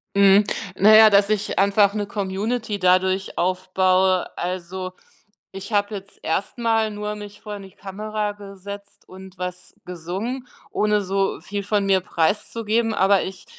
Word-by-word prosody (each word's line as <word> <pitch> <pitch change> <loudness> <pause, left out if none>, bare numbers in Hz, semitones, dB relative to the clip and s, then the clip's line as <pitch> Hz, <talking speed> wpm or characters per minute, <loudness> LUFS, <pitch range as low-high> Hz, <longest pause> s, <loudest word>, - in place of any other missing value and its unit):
Mhm, 200 +1 +6 0.3
na 215 +3 +6
ja, 220 0 +9
dass 200 0 +4
ich 210 -1 -1
einfach 200 0 +4
'ne 205 -1 -3
Community 205 +2 -3
dadurch 185 +1 +1
aufbaue. 185 +1 +2
Also, 185 +1 -4 0.6
ich 195 +3 -8
habe 205 +1 +1
jetzt 195 0 -9
erst 190 +9 -2
mal 225 -2 +1
nur 210 0 -4
mich 205 -1 -10
vor 210 -1 -7
'ne 195 -1 -12
Kamera 210 +2 -4
gesetzt 200 0 -11
und 190 0 -13
was 180 0 -6
gesungen, 190 +9 -5 0.2
ohne 210 0 +2
so 195 0 -1
viel 205 0 -5
von 205 0 0
mir 195 -1 +3
preiszugeben, 215 +6 0
aber 195 -1 +3
ich 185 -1 -7
200 Hz, 145 wpm, -22 LUFS, 185-210 Hz, 0.6 s, ja